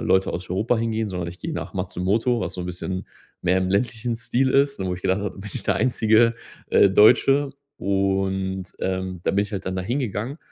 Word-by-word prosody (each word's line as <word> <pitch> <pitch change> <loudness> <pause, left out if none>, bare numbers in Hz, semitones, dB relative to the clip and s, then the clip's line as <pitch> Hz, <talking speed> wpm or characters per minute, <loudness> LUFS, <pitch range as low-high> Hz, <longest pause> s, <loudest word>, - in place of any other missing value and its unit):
Leute 95 0 +2
aus 90 +1 -5
Europa 110 +6 +1
hingehen, 110 -1 -1
sondern 90 -3 -4
ich 90 +2 -9
gehe 165 - -5
nach 115 - -5
Matsumoto, 100 +6 0
was 90 -2 -2
so 90 - -5
'n 90 - -4
bisschen 90 +1 -4 0.4
mehr 90 +1 +3
im 95 0 0
ländlichen 115 +2 0
Stil 120 +3 0
ist, 140 +1 +2
und 95 - -3
wo 90 - -1
ich 90 - -10
gedacht 95 +2 +1
habe: 105 - -2
‚Da - - -14
bin 105 +1 -8
ich - - -4
der - - +1
einzige, 115 -2 +3 0.4
äh, 100 - +6
Deutsche.‘“ 135 +7 +5 0.3
Und, 95 -1 0
ähm, 95 -1 -3
da - - +1
bin 100 +1 +2
ich 105 +1 -7
halt 95 -1 -4
dann 95 0 -2
da 95 - -2
hingegangen. 120 - -3
100 Hz, 225 wpm, -23 LUFS, 95-115 Hz, 0.4 s, äh